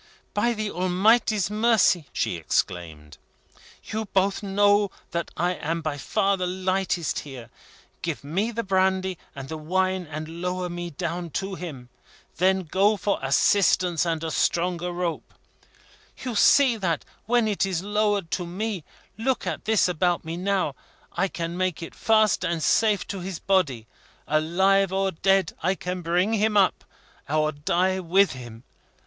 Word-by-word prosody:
"By 235 Hz, +3 st, +1 dB
the 215 Hz, -2 st, -3 dB
Almighty's 200 Hz, +2 st, +2 dB
mercy!" 210 Hz, -7 st, +3 dB
she -, -, -1 dB
exclaimed. 80 Hz, -2 st, -3 dB, 0.6 s
"You 220 Hz, 0 st, -4 dB
both 195 Hz, 0 st, +1 dB
know 205 Hz, 0 st, +3 dB, 0.2 s
that 170 Hz, 0 st, -2 dB
I 175 Hz, +1 st, +1 dB
am 165 Hz, -1 st, -3 dB
by 150 Hz, -2 st, -3 dB
far 195 Hz, +7 st, +1 dB
the 180 Hz, -1 st, -1 dB
lightest 185 Hz, -2 st, -1 dB
here. 130 Hz, -4 st, -10 dB, 0.5 s
Give 165 Hz, -4 st, -3 dB
me 185 Hz, +10 st, -1 dB
the 230 Hz, 0 st, -3 dB
brandy 190 Hz, -2 st, +1 dB, 0.2 s
and 135 Hz, -1 st, -7 dB
the 160 Hz, +1 st, -6 dB
wine, 185 Hz, +2 st, 0 dB
and 155 Hz, +2 st, -6 dB
lower 180 Hz, 0 st, -2 dB
me 175 Hz, 0 st, -5 dB
down 170 Hz, +2 st, -4 dB
to 195 Hz, 0 st, -4 dB
him. 150 Hz, -9 st, -7 dB, 0.5 s
Then 190 Hz, +2 st, +2 dB
go 195 Hz, +6 st, +2 dB
for 200 Hz, +1 st, -1 dB
assistance 175 Hz, +5 st, +3 dB
and 165 Hz, -2 st, -1 dB
a 160 Hz, -, -2 dB
stronger 175 Hz, +2 st, 0 dB
rope. 175 Hz, -2 st, -4 dB, 0.9 s
You 250 Hz, -2 st, -3 dB
see 250 Hz, +2 st, +5 dB
that 170 Hz, -7 st, -1 dB, 0.2 s
when 240 Hz, -1 st, +3 dB
it 210 Hz, -2 st, 0 dB
is 185 Hz, -3 st, -1 dB
lowered 205 Hz, -4 st, 0 dB
to 175 Hz, -2 st, -2 dB
me 195 Hz, 0 st, -3 dB, 0.4 s
look 260 Hz, +3 st, 0 dB
at -, -, -4 dB
this 220 Hz, -3 st, +3 dB
about 175 Hz, 0 st, 0 dB
me 165 Hz, +1 st, -4 dB
now 185 Hz, -4 st, 0 dB, 0.4 s
I 195 Hz, +3 st, +1 dB
can 170 Hz, -2 st, -4 dB
make 185 Hz, -2 st, -1 dB
it -, -, -8 dB
fast 215 Hz, -4 st, +3 dB
and 170 Hz, -3 st, -1 dB
safe 215 Hz, -3 st, +3 dB
to 195 Hz, -, -4 dB
his 185 Hz, -1 st, -5 dB
body. 160 Hz, -, +1 dB, 0.4 s
Alive 190 Hz, +5 st, +2 dB
or 195 Hz, 0 st, 0 dB
dead, 195 Hz, +1 st, +2 dB
I 185 Hz, +4 st, +1 dB
will 180 Hz, 0 st, -2 dB
bring 175 Hz, +5 st, +1 dB
him 215 Hz, -1 st, +2 dB
up, 195 Hz, -2 st, +2 dB, 0.4 s
or 155 Hz, +1 st, +2 dB
die 180 Hz, +6 st, 0 dB
with 185 Hz, +3 st, +3 dB
him. 120 Hz, -3 st, -10 dB
185 Hz, 155 wpm, -25 LUFS, 165-200 Hz, 0.9 s, see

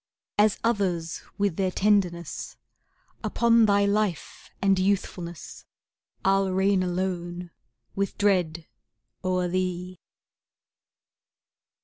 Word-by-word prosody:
As 210 Hz, 0 st, +4 dB
others 185 Hz, -8 st, 0 dB, 0.2 s
with 200 Hz, -5 st, 0 dB
their 190 Hz, -1 st, +1 dB
tenderness, 185 Hz, -4 st, 0 dB, 0.7 s
Upon 230 Hz, -1 st, +4 dB
thy 200 Hz, 0 st, +4 dB
life 200 Hz, -4 st, -1 dB
and 195 Hz, -1 st, +3 dB
youthfulness, 185 Hz, -3 st, -2 dB, 0.6 s
I'll 195 Hz, 0 st, +3 dB
reign 190 Hz, +1 st, +2 dB
alone 175 Hz, -1 st, -3 dB, 0.4 s
with 200 Hz, -1 st, -2 dB
dread 175 Hz, -5 st, +1 dB, 0.6 s
o'er 185 Hz, -1 st, +1 dB
thee. 180 Hz, 0 st, -2 dB
185 Hz, 85 wpm, -26 LUFS, 175-200 Hz, 0.7 s, As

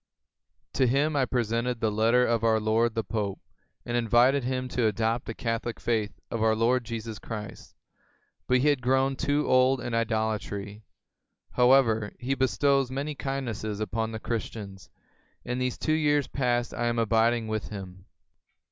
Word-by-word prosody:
To 130 Hz, -, +2 dB
him 145 Hz, +5 st, +1 dB
I 135 Hz, -2 st, +3 dB
presented 120 Hz, 0 st, -1 dB
the 110 Hz, -1 st, +1 dB
letter 115 Hz, +4 st, +3 dB
of 115 Hz, -1 st, 0 dB
our 110 Hz, -1 st, +3 dB
lord 110 Hz, +2 st, +1 dB
the 115 Hz, -, 0 dB
Pope, 105 Hz, -4 st, -3 dB, 0.5 s
and 120 Hz, -, -3 dB
invited 120 Hz, +4 st, +3 dB
him 130 Hz, 0 st, -2 dB
to 120 Hz, -2 st, +1 dB
adopt 115 Hz, +3 st, 0 dB
the 115 Hz, -, -6 dB
Catholic 115 Hz, 0 st, -3 dB
faith 110 Hz, -3 st, -1 dB
of 115 Hz, -, -2 dB
our 110 Hz, 0 st, +3 dB
Lord 120 Hz, +2 st, +1 dB
Jesus 115 Hz, -2 st, -5 dB
Christ; 105 Hz, 0 st, -8 dB, 0.7 s
but 125 Hz, -, +4 dB
he 150 Hz, -, +4 dB
had 145 Hz, -3 st, +1 dB
grown 135 Hz, +2 st, +2 dB
too 145 Hz, +2 st, 0 dB
old 130 Hz, +1 st, +4 dB
in 120 Hz, -1 st, -5 dB
idolatry. 110 Hz, -2 st, -2 dB, 0.7 s
However, 125 Hz, -4 st, +3 dB
he 125 Hz, +2 st, -2 dB
bestows 135 Hz, 0 st, +2 dB
many 140 Hz, +3 st, -3 dB
kindnesses 120 Hz, -7 st, -4 dB
upon 110 Hz, +1 st, -2 dB
the 110 Hz, -, -5 dB
Christians, 105 Hz, -6 st, -5 dB, 0.6 s
and 125 Hz, +1 st, -2 dB
these 125 Hz, -1 st, -1 dB
two 155 Hz, -, 0 dB
years 145 Hz, -2 st, +2 dB
past 120 Hz, -3 st, -1 dB
I 120 Hz, -, -1 dB
am 120 Hz, 0 st, 0 dB
abiding 115 Hz, +1 st, +2 dB
with 110 Hz, -1 st, -3 dB
him. 95 Hz, -2 st, -9 dB
115 Hz, 160 wpm, -27 LUFS, 110-130 Hz, 0.7 s, but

